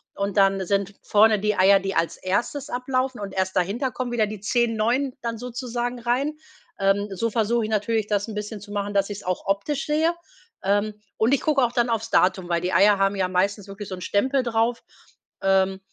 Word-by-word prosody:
und 200 0 -3
dann 195 -1 +3
sind 200 0 0
vorne 215 0 +4
die 210 +1 0
Eier, 195 +1 +6
die 195 0 -4
als 165 - 0
erstes 235 +10 -2
ablaufen 255 0 -1
und 195 -1 -6
erst 190 0 -1
dahinter 200 +9 0
kommen 250 +1 -4
wieder 225 -3 +1
die 210 -1 -7
10 235 +2 +1
neuen 245 +5 0
dann 230 -1 -3
sozusagen 245 0 -4
rein. 260 +6 -1 0.4
Ähm, 195 +1 +2
so 230 +5 0
versuche 230 +1 +1
ich 220 - -5
natürlich, 215 0 0
das 205 0 0
'n 220 - -7
bisschen 210 0 -5
zu 205 +1 -11
machen, 205 0 -3
dass 200 0 +1
ich 205 - -5
es - - -14
auch 185 0 -3
optisch 200 +9 -1
sehe. 315 +3 +2 0.5
Ähm, 205 +2 +1 0.2
und 225 +4 +3
ich 280 - +2
gucke 290 -4 +2
auch 240 - +2
dann 240 -1 +1
aufs 225 0 -2
Datum, 185 -1 +2
weil 170 -1 +1
die 180 +1 -2
Eier 200 +3 +5
haben 195 +1 +2
ja 190 -1 0
meistens 195 +2 0
wirklich 200 +1 -8
so 185 - -4
'n 180 - -11
Stempel 260 +8 +1
drauf. 230 0 0 0.6
Ähm, 190 0 +2
210 Hz, 215 wpm, -24 LUFS, 195-240 Hz, 0.6 s, Eier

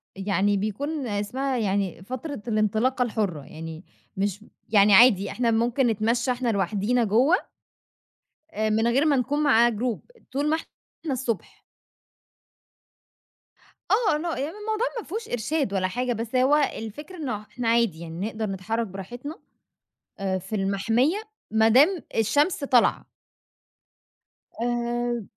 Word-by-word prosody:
يعني 200 +1 +1
بيكون 265 +8 -3
اسمها 250 +6 -2
يعني 195 -4 -1
فترة 255 +3 -6
الانطلاقة 220 +4 +1
الحُرّة. 205 -9 -2
يعني 160 +2 -8 0.3
مش 200 +1 -2
م - - -19 0.2
يعني 205 -1 +5
عادي، 205 -2 +6
إحنا 235 -1 +1
ممكن 240 +3 +2
نتمشى 230 +3 +1
إحنا 245 -1 -1
لوحدينا 210 +4 +1
جوّه، 245 - +4 1.2
آآ 215 -6 -1
من 220 +2 +2
غير 270 +6 +3
ما 290 -2 +4
نكون 290 +4 0
مع 240 -4 +5
جروب. 235 0 -2 0.3
طول 285 +3 0
ما 315 - +3 0.5
إحنا 285 - 0
الصبح. 240 -5 -4 2.3
آه. 415 -7 +3
لأ 335 +3 -3
يعني 300 +9 -4
الموضوع 435 +2 -1
ما - - -6
فيهوش 435 +6 -5
إرشاد 245 0 -1
ولا 185 -1 +1
حاجة، 245 +5 -1
بس 230 +2 -5
هو 260 +3 +4
الفكرة 295 - -3
إنه 255 -10 -3
إحنا 230 +3 -6
عادي. 230 -8 +2
يعني 170 +4 -5
نقدر 220 0 -3
نتحرّك 215 +3 -2
براحتنا 240 - -8 0.8
أ 190 -1 -1
في 190 +4 -6
المَحمية 225 - +1 0.3
ما 220 0 +4
دام 300 - +5
الشمس 285 - +2
طالعة. 250 -4 +3 1.5
آآ، 240 -1 -1
235 Hz, 130 wpm, -25 LUFS, 205-270 Hz, 2.3 s, عادي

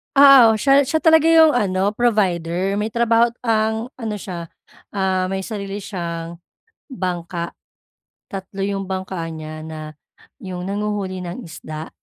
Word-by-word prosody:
Oo. 275 -5 +8
Siya 275 +5 +4
siya 315 +4 0
talaga 320 -1 +5
'yung 325 -1 +7
ano 200 -6 +1
provider. 195 -4 0
May 210 - 0
trabaho't 235 0 +3
ang 220 +1 0
ano 225 -4 -3
siya, 180 -4 -6 0.5
ah, 190 -2 +1
may 190 +1 -3
sarili 200 -1 -5
siyang 170 -3 -5 0.5
bangka, 175 -5 -4 0.7
tatlo 195 0 -6
'yung 195 0 -2
bangka 185 -2 -4
niya, 155 0 -8
na 155 -1 -8 0.4
'yung 185 -7 -7
nanghuhuli 200 -3 -3
ng 175 +8 -6
isda. 155 +1 -8
195 Hz, 130 wpm, -20 LUFS, 175-225 Hz, 0.7 s, Oo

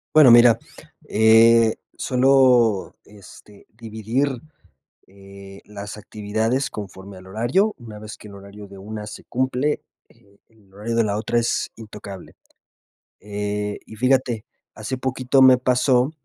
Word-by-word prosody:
Bueno, 145 -6 +8
mira, 120 -1 +7 0.5
eh, 115 +1 +5 0.2
suelo, 125 -5 +2
este, 105 0 -17
dividir, 115 +4 -3 0.6
eh, 100 0 -14
las 105 0 -9
actividades 110 +7 -2
conforme 95 -1 -9
al 95 - -14
horario. 120 - 0
Una 110 -5 -11
vez 110 0 -10
que - - -13
el 100 - -13
horario 100 +1 -12
de 100 0 -13
una 105 +2 -7
se 105 - -10
cumple, 130 +3 -1 0.3
eh, 100 0 -26
el 105 -4 -27
horario 110 +4 -4
de 115 - +3
la 105 -1 -1
otra 120 +2 -1
es 115 - -1
intocable. 100 -4 -11 0.8
Eh, 105 0 -4
y 110 - -11
fíjate, 125 -2 0 0.3
hace 110 +5 -5
poquito 130 +1 0
me 130 -1 +7
pasó 125 +1 +1
110 Hz, 135 wpm, -21 LUFS, 105-125 Hz, 0.8 s, Bueno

